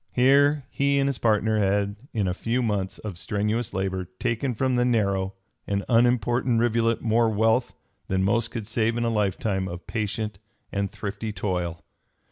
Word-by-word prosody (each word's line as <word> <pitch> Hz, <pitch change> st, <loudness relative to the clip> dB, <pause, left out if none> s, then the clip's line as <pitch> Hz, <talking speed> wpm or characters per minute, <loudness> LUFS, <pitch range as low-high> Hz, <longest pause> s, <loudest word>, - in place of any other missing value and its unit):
Here 140 Hz, +3 st, +4 dB
he 140 Hz, 0 st, +2 dB
and 140 Hz, 0 st, +2 dB
his 140 Hz, -3 st, -1 dB
partner 110 Hz, -1 st, +2 dB
had 100 Hz, 0 st, +1 dB, 0.2 s
in 105 Hz, -4 st, 0 dB
a 90 Hz, -, 0 dB
few 115 Hz, +6 st, -1 dB
months 100 Hz, -4 st, -1 dB
of 100 Hz, -5 st, -7 dB
strenuous 105 Hz, +3 st, -1 dB
labor 95 Hz, -1 st, -2 dB
taken 120 Hz, +1 st, -1 dB
from 130 Hz, +2 st, +1 dB
the 120 Hz, -, +3 dB
narrow 100 Hz, -5 st, +1 dB, 0.3 s
and 100 Hz, 0 st, -1 dB
unimportant 120 Hz, 0 st, +3 dB
rivulet 115 Hz, -1 st, +1 dB
more 115 Hz, 0 st, +3 dB
wealth 110 Hz, +3 st, +1 dB, 0.3 s
than 95 Hz, 0 st, +1 dB
most 115 Hz, +4 st, +1 dB
could 115 Hz, -3 st, -5 dB
save 115 Hz, +1 st, 0 dB
in 120 Hz, -, 0 dB
a -, -, +2 dB
lifetime 100 Hz, -2 st, 0 dB
of 85 Hz, -1 st, -7 dB
patient 105 Hz, -2 st, -3 dB, 0.3 s
and 100 Hz, 0 st, -1 dB
thrifty 105 Hz, +3 st, -5 dB
toil. 90 Hz, -3 st, -3 dB
110 Hz, 165 wpm, -25 LUFS, 100-120 Hz, 0.3 s, Here